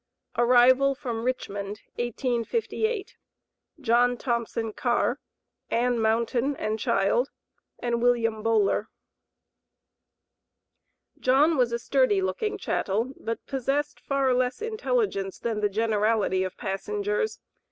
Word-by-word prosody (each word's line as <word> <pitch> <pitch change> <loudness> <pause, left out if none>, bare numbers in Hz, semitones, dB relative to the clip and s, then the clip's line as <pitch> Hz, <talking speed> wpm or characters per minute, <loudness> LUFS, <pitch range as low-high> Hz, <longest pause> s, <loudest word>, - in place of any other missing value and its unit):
ARRIVAL 250 +3 +5
FROM 240 -4 -4
RICHMOND, 205 -4 -3 0.2
1858. 270 - -2 0.6
JOHN 245 0 +3
THOMPSON 230 -2 -2
CARR, 240 +3 0 0.5
ANN 240 0 +1
MOUNTAIN 235 +5 +1
AND 215 -3 -2
CHILD, 210 +7 +1 0.5
AND 235 -1 -1
WILLIAM 230 -3 +2
BOWLER. 215 -1 +2 2.3
John 285 +6 +4
was 250 -4 +2
a 235 - 0
sturdy 255 -4 +2
looking 190 - -1
chattel, 225 +7 -1
but 230 0 -5
possessed 275 +2 -1
far 275 -2 +1
less 250 0 0
intelligence 435 - -1
than 225 -2 -2
the 210 -1 +1
generality 215 -2 +1
of 185 - -5
passengers. 415 - -2
240 Hz, 100 wpm, -26 LUFS, 220-270 Hz, 2.3 s, ARRIVAL